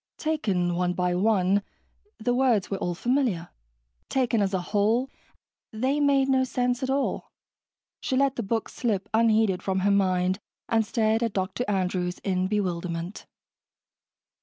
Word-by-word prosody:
Taken 200 - 0
one 180 +1 0
by 180 0 0
one, 195 0 +2 0.6
the 245 +2 0
words 245 -7 +2
were 195 - -1
all 175 -1 -2
familiar 235 -5 0 0.6
taken 240 -4 +1
as 195 -1 +1
a 190 - 0
whole, 225 +6 +2 0.6
they 260 +6 0
made 280 -2 +3
no 265 -1 +3
sense 250 -1 -1
at 260 - -2
all. 275 +1 -1 0.7
She 260 - -1
let 275 0 +2
the - - -2
book 225 +2 -1
slip 210 -5 -2
unheeded 220 -4 +3
from 190 -1 -1
her 200 +1 +3
mind 185 -1 +2 0.3
and 225 -1 +2
stared 220 0 +1
at 230 -3 -1
Dr. 190 +5 -2
Andrews 180 -2 -1
in 185 -1 0
bewilderment. 180 -2 -3
210 Hz, 145 wpm, -26 LUFS, 185-245 Hz, 0.7 s, made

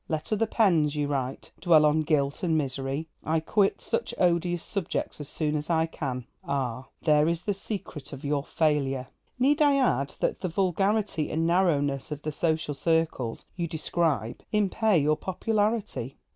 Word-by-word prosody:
'Let 155 +6 -2
other 220 +1 +1
pens,' 165 -10 +3
you 150 -1 0
write, 135 -2 -3
'dwell 165 -3 +5
on 150 +1 +3
guilt 150 -1 0
and 165 -4 +2
misery. 135 +1 -2 0.2
I 160 +2 +1
quit 195 +5 +1
such - - -2
odious 175 -1 +1
subjects 195 -5 -3
as 145 - -7
soon 150 -1 -1
as 150 +2 -3
I 160 -1 +3
can.' 130 -6 -4 0.2
Ah, 130 -2 -2 0.2
there 150 -1 +4
is 170 +1 -2
the 205 - 0
secret 190 -7 -6
of 135 - -8
your 140 -1 0
failure! 140 -5 0 0.3
Need 285 +5 +3
I 290 -2 +5
add 140 - +1
that - - -1
the 185 - -1
vulgarity 195 -1 0
and 160 +1 0
narrowness 150 -6 +1
of 150 0 -5
the 155 - -2
social 160 -1 0
circles 160 -6 0
you 170 -2 -2
describe 155 - -1
impair 210 -1 +2
your 150 0 +2
popularity? 210 - -1
160 Hz, 165 wpm, -27 LUFS, 145-185 Hz, 0.3 s, dwell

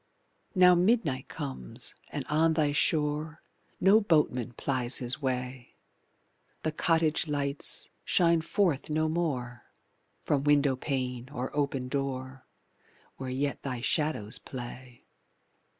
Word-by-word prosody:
Now 180 -1 +7
midnight 175 - +2
comes, 65 -2 -1 0.2
and - - -4
on 160 +2 +3
thy 155 -2 +2
shore 150 +1 0 0.4
No 200 +4 +6
boatman 150 - +1
plies 125 -1 0
his 125 +3 -3
way, 125 -1 -3 0.9
The 155 - 0
cottage 160 0 +1
lights 140 -1 -1
shine 170 -2 +3
forth 165 -4 0
no 155 +1 +1
more 135 -8 -2 0.6
From 140 -2 +1
window 145 -2 +3
pane 130 -2 -3
or 130 -1 -4
open 140 -3 -1
door 130 -1 -4 0.7
Where 130 -1 -5
yet 140 +2 -2
thy 125 -3 -4
shadows 150 -7 0
play. 125 -1 -9
140 Hz, 115 wpm, -29 LUFS, 130-155 Hz, 0.9 s, Now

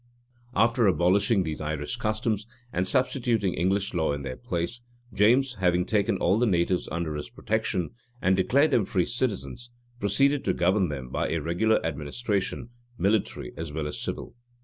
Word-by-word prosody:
[*] 120 0 -34
After 115 +2 +3
abolishing 95 +4 +3
these 80 -2 -4
Irish 75 +3 -3
customs, 110 -1 -1 0.3
and 90 +1 0
substituting 120 -6 +1
English 95 +4 0
law 80 -4 +1
in 70 -1 -4
their 65 -2 -4
place, 85 - -3 0.3
James, 125 +4 +3
having 90 -1 +2
taken 105 0 +1
all 95 +5 +2
the 120 - +3
natives 90 -1 +1
under 85 -1 -2
his 75 -1 -5
protection, 110 -5 -2 0.3
and 95 -3 +3
declared 140 +11 +3
them 110 - +3
free 90 -2 +1
citizens, 120 0 -3 0.3
proceeded 135 +8 +2
to - - +1
govern 90 +1 +2
them 65 -4 -5
by - - -1
a 85 - 0
regular 85 +8 +2
administration, 95 - -2 0.3
military 100 - 0
at 80 -2 -5
well 80 -1 -2
as 75 - -4
civil. - - -4
95 Hz, 165 wpm, -27 LUFS, 85-115 Hz, 0.3 s, After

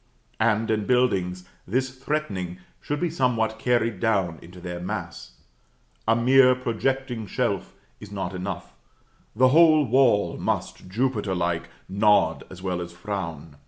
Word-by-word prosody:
And, 110 0 +2
in 105 -2 0
buildings, 95 -8 +1 0.2
this 130 +6 0
threatening 115 - -3 0.2
should 145 0 -3
be 175 -2 -1
somewhat 115 -7 0
carried 115 -4 +1
down 95 -7 0
into 90 +2 -13
their 90 0 -6
mass. 85 - -6 0.7
A 115 - +5
mere 130 +2 +5
projecting 125 -1 -2
shelf - - -2 0.2
is 105 -1 -11
not 95 -2 -4
enough, 95 +2 -5 0.6
the 130 +3 +5
whole 155 0 +6
wall 120 -4 +3
must, - - -3
Jupiter 105 -3 -1
like, 85 -1 -1 0.2
nod 105 +2 +3
as 95 0 -11
well 90 -2 -2
as 85 0 -6
frown. 85 -6 -6
110 Hz, 135 wpm, -25 LUFS, 90-125 Hz, 0.7 s, whole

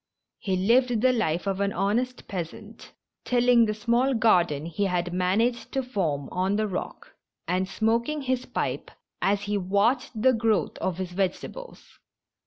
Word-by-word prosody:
He 190 -2 -1
lived 235 +4 +3
the 255 +1 +4
life 175 -8 0
of 195 0 -1
an 200 0 0
honest 245 +6 -1
peasant, 205 +4 -7 0.3
tilling 245 -1 +4
the 215 - -1
small 240 +4 +1
garden 175 -10 +3
he 170 +4 -2
had 180 -2 -1
managed 215 +7 0
to 270 - 0
form 165 - -2
on 190 +2 0
the 215 0 0
rock, 185 -2 -6 0.3
and 185 +1 0
smoking 235 +8 0
his 255 -1 -1
pipe - - -3 0.3
as 200 0 +1
he 205 0 -1
watched 220 +7 0
the 255 +4 +4
growth 220 -7 +1
of 185 -2 -2
his 185 -1 -4
vegetables. 195 - -5
210 Hz, 155 wpm, -26 LUFS, 185-240 Hz, 0.3 s, the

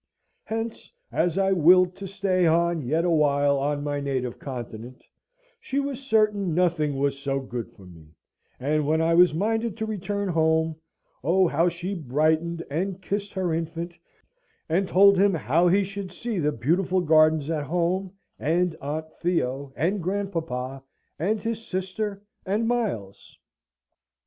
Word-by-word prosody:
Hence, 225 +1 -5 0.2
as 175 0 0
I 195 0 +2
willed 180 +1 +5
to 195 - -6
stay 190 -2 +1
on 170 0 +2
yet 155 +6 0
a 175 - +2
while 145 -2 +3
on 145 +1 -1
my 145 -1 -2
native 130 -3 -3
continent, 120 -2 -8 0.6
she 275 - -2
was 280 -2 -3
certain 215 - +1
nothing 160 -5 +1
was 140 0 0
so 135 0 -1
good 125 -3 -6
for 95 - -16
me; 85 -4 -14 0.5
and 150 +2 0
when 160 +1 +2
I 165 +1 +2
was 175 -2 +5
minded 225 +3 -1
to 220 - -2
return 205 -1 -3
home 160 -1 +2 0.5
oh, 180 +5 +3
how 165 +3 +2
she 175 +3 -5
brightened, 160 +2 0
and 185 +5 -2
kissed 200 +2 -3
her 185 -3 -1
infant, 165 +1 -4 0.7
and 185 +4 +1
told 200 +1 +6
him 200 -2 +4
how 160 +5 +2
he 195 +3 +4
should 195 -1 -6
see 225 +1 -4
the 150 -2 +1
beautiful 175 +9 +1
gardens 155 -2 +4
at 150 -3 -2
home, 180 +4 -1 0.3
and 170 +3 +1
Aunt 150 +3 -3 0.2
Theo, 140 -6 -1
and 180 +8 0
grandpapa, 165 -9 -3 0.4
and 210 +7 0
his 225 0 -3
sister, 195 +2 -4 0.2
and 210 +4 0
Miles. 205 - -3
170 Hz, 150 wpm, -25 LUFS, 150-195 Hz, 0.7 s, told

